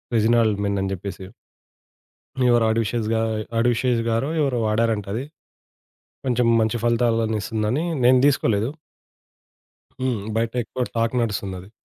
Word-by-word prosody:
'Regnal 115 0 +3
men' 100 -1 0
అని 95 - -1
జెప్పేసి 95 0 -6 1.3
ఎవరు 120 -1 +4
ఆడివి 110 0 +1
శేష 120 -2 -2
గా 110 - +1 0.4
'ఆడవి 120 0 +2
శేష' 125 -3 +1
గారో 115 +5 0
ఎవరో 135 -4 +1
వాడారంటది. 110 +1 0 1.0
కొంచెం 125 -2 +1
మంచి 110 +1 +1
ఫలితాలను 115 -2 +1
ఇస్తుందని, 110 +8 -1 0.2
నేను 130 +1 +6
దీసుకోలేదు. 115 -5 +1 1.3
హ్మ్. 130 -4 -1 0.2
బయటెక్కువ 120 +2 -1
టాక్ 115 +1 0
నడుస్తుందది. 100 -3 -4
115 Hz, 115 wpm, -22 LUFS, 110-120 Hz, 1.3 s, నేను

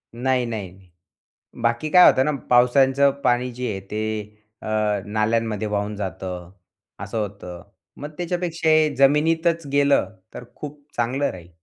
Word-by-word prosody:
नाही, 125 +1 0
नाही, 95 -5 -7 0.7
बाकी 120 +6 0
काय 180 +1 +8
होतं 130 - +2
ना, 150 - +1 0.2
पावसाचं 135 +3 +4
पाणी 125 0 +1
जे 125 0 -4
आहे, 95 - -4
ते 105 0 -4 0.2
अ, - - -8 0.4
नाल्यांमध्ये 110 0 -1
वाहून 105 0 -2
जातं, 90 -2 -6 0.5
असं 100 +3 -5
होतं, 90 -4 -7 0.3
मग 145 - -7
त्याच्यापेक्षा 175 -2 -2
हे 155 -1 +4
जमिनीतच 160 +4 +2
गेलं, 140 -8 +3 0.2
तर - - -8
खूप 150 0 -9 0.2
चांगलं 130 +4 0
राहील. 85 -2 -12
120 Hz, 135 wpm, -22 LUFS, 105-145 Hz, 0.7 s, काय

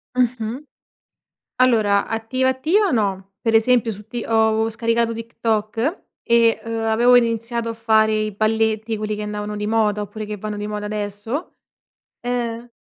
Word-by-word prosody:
Mh-mh. 245 +1 -1 0.9
Allora 220 -6 +3
attiva, 225 +4 -1
attiva 335 +10 +2
no. 195 -5 -1
Per 225 -1 0
esempio 230 +1 +4
su 210 -1 -8
ti 235 +1 -5
ho 220 0 +2
scaricato 230 +1 0
TikTok 230 - -2 0.2
e, 230 -1 +3
uhm, 230 - -5
avevo 235 +3 +5
iniziato 230 0 0
a - - -2
fare 220 -1 +3
i 215 -1 0
balletti, 220 +1 0
quelli 215 0 -3
che 210 - -5
andavano 210 0 -4
di 210 0 -3
moda, 210 -1 +1
oppure 210 +2 -6
che 210 0 -5
vanno 210 +1 -5
di 205 0 -4
moda 210 0 -4
adesso, 210 - -4 0.6
ehm 240 -1 -3
225 Hz, 150 wpm, -21 LUFS, 210-235 Hz, 0.9 s, avevo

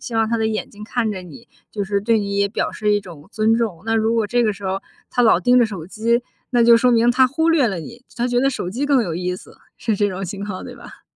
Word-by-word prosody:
希 235 - -7
望 225 -1 +2
他 230 - +1
的 220 0 0
眼 220 -1 -3
睛 210 +1 -10
看 225 -1 -1
着 190 -3 -5
你， 230 +7 -13 0.2
就 205 - -2
是 200 +1 -1
对 225 +2 +2
你 200 0 -3
也 200 0 +3
表 215 - -2
示 210 -1 0
一 205 - +2
种 170 -6 -13
尊 220 +1 +2
重。 205 -8 -2
那 225 0 +1
如 220 +1 +1
果 225 -2 +1
这 240 -1 +2
个 215 - +2
时 200 0 -11
候 190 +1 -2 0.3
他 245 - +1
老 220 -6 +5
盯 245 +6 +4
着 235 - +4
手 190 -7 -7
机， 230 +4 0 0.3
那 240 -2 +3
就 235 0 +7
说 245 +1 +3
明 235 +1 +4
他 255 +1 +4
忽 320 +6 0
略 300 -7 +4
了 190 -5 -2
你， 235 +9 -11
他 240 +1 0
觉 245 - +1
得 270 +2 +3
手 180 -8 -4
机 270 +7 -2
更 275 -4 +3
有 170 -7 -3
意 180 0 -2
思， - - -13 0.2
是 220 -3 -1
这 205 0 +2
种 190 0 -4
情 200 +2 -5
况， 195 -3 -6
对 - - -9
吧？ - - -14
220 Hz, 310 characters per minute, -20 LUFS, 200-240 Hz, 0.3 s, 就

